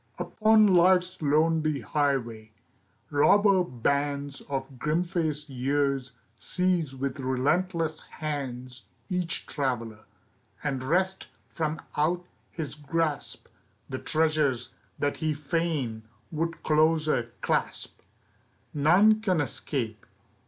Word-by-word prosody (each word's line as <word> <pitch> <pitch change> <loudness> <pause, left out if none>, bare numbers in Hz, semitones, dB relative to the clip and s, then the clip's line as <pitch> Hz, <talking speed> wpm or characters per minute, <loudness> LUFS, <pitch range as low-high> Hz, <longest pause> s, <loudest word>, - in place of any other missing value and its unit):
UPON 215 -2 +4
Life's 180 +1 +4
lonely 155 -1 +2
highway, 115 -3 -1 0.6
robber 195 +6 +5
bands 140 0 -1
Of 135 -2 -4
grim 155 +5 +1
faced 160 -4 -2
years 135 0 0 0.3
seize 180 -6 0
with 135 +1 -3
relentless 155 +5 0 0.2
hands 130 -4 -5 0.2
Each 180 -3 -1
traveler, 115 -6 -3 0.6
and 135 -3 -1
wrest 185 +8 0 0.2
from 155 -1 -2
out 175 +4 +1 0.2
his 160 -4 -5
grasp 150 0 -2 0.4
The - - -4
treasures 155 -6 +1 0.3
that 145 0 -1
he 155 -1 -1
fain 145 -6 -1 0.3
would 165 +1 -3
closer 155 -5 +2
clasp. - - -1 0.7
None 190 +9 +5
can 185 -6 +1
escape. 120 -6 -3
150 Hz, 95 wpm, -27 LUFS, 135-165 Hz, 0.7 s, robber